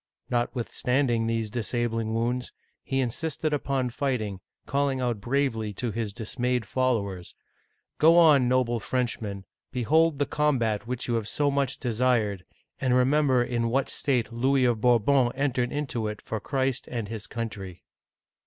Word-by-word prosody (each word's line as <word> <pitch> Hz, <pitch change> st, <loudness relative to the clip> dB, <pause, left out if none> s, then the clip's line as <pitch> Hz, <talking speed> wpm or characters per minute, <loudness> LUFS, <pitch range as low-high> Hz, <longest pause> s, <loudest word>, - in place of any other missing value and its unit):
Notwithstanding 120 Hz, 0 st, 0 dB
these 115 Hz, -2 st, -1 dB
disabling 115 Hz, -1 st, -1 dB
wounds, 120 Hz, +2 st, -1 dB, 0.3 s
he 135 Hz, 0 st, -1 dB
insisted 150 Hz, +5 st, -2 dB
upon 135 Hz, -3 st, -1 dB
fighting, 115 Hz, -8 st, -2 dB, 0.3 s
calling 140 Hz, -1 st, 0 dB
out 120 Hz, -5 st, -1 dB
bravely 115 Hz, -3 st, 0 dB
to 120 Hz, +3 st, -3 dB
his 110 Hz, -1 st, -3 dB
dismayed 125 Hz, +2 st, -2 dB
followers, 100 Hz, -7 st, -1 dB, 0.3 s
" -, -, -48 dB
Go 165 Hz, +2 st, +6 dB
on, 150 Hz, -7 st, +6 dB
noble 125 Hz, -2 st, +2 dB
Frenchmen, 110 Hz, -5 st, -3 dB, 0.3 s
behold 155 Hz, +5 st, +2 dB
the 145 Hz, -, +1 dB
combat 120 Hz, -9 st, 0 dB
which 125 Hz, 0 st, -3 dB
you 120 Hz, -, 0 dB
have 115 Hz, -2 st, -1 dB
so 145 Hz, +4 st, +1 dB
much 140 Hz, -1 st, 0 dB
desired, 115 Hz, -5 st, 0 dB, 0.4 s
and 130 Hz, -2 st, +2 dB
remember 130 Hz, 0 st, +3 dB
in 120 Hz, -1 st, -1 dB
what 135 Hz, +3 st, 0 dB
state 125 Hz, -4 st, -1 dB
Louis 130 Hz, +2 st, +2 dB
of 120 Hz, -3 st, +1 dB
Bourbon 125 Hz, +2 st, +4 dB
entered 130 Hz, -3 st, 0 dB
into 130 Hz, -7 st, -2 dB
it 105 Hz, -1 st, -5 dB
for 110 Hz, -, -3 dB
Christ 135 Hz, +1 st, -1 dB
and 115 Hz, -4 st, -3 dB
his 110 Hz, 0 st, -6 dB
country 100 Hz, -6 st, -6 dB
125 Hz, 145 wpm, -27 LUFS, 115-135 Hz, 0.4 s, Go